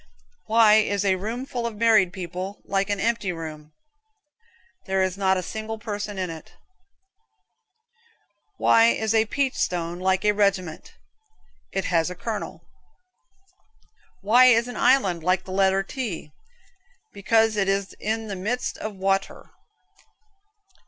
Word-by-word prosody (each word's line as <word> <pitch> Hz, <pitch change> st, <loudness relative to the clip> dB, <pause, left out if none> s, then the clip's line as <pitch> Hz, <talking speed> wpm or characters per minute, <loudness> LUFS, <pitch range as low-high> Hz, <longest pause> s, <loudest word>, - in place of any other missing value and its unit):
Why 220 Hz, -1 st, +6 dB
is 205 Hz, -2 st, +1 dB
a 195 Hz, -, +3 dB
room 220 Hz, +7 st, -4 dB
full 240 Hz, -3 st, -3 dB
of 230 Hz, -, -7 dB
married 215 Hz, -4 st, +4 dB, 0.2 s
folks 190 Hz, +3 st, -5 dB
like 195 Hz, +1 st, -1 dB
an 205 Hz, -1 st, -1 dB
empty 230 Hz, -4 st, 0 dB
room? 155 Hz, -2 st, -8 dB, 1.2 s
There 190 Hz, 0 st, +1 dB
is 185 Hz, -1 st, -1 dB
not 190 Hz, -1 st, +1 dB
a 185 Hz, -, -3 dB
single 220 Hz, +4 st, -5 dB
person 205 Hz, -2 st, -5 dB
in 185 Hz, -2 st, -3 dB
it. 160 Hz, -1 st, -11 dB, 2.0 s
Why 115 Hz, 0 st, +5 dB
is 215 Hz, -, +1 dB
a 220 Hz, 0 st, +3 dB
peach 275 Hz, +2 st, 0 dB
stone 175 Hz, -1 st, -2 dB
like 190 Hz, +1 st, 0 dB
a 210 Hz, -, +5 dB
regiment? 200 Hz, -5 st, -1 dB, 0.8 s
It 195 Hz, -, -2 dB
has 165 Hz, -1 st, +1 dB
a 180 Hz, -, -7 dB
kernel 215 Hz, +3 st, -5 dB
(Colonel). -, -, -36 dB, 1.5 s
Why 235 Hz, +5 st, +5 dB
is 235 Hz, -1 st, +5 dB
an 245 Hz, -, -7 dB
island 195 Hz, -11 st, +2 dB
like 185 Hz, +3 st, +1 dB
the 185 Hz, -, -10 dB
letter 195 Hz, 0 st, +2 dB
T? 195 Hz, -, -6 dB, 0.8 s
Because 225 Hz, +2 st, +2 dB
it 195 Hz, -2 st, 0 dB
is 195 Hz, -1 st, -1 dB
in 220 Hz, +1 st, -2 dB
the 205 Hz, -2 st, -5 dB
midst 215 Hz, +7 st, -3 dB
of 215 Hz, -1 st, -5 dB
wa 195 Hz, 0 st, +2 dB
t -, -, -13 dB
er. -, -, -15 dB
200 Hz, 145 wpm, -24 LUFS, 185-220 Hz, 2.0 s, Why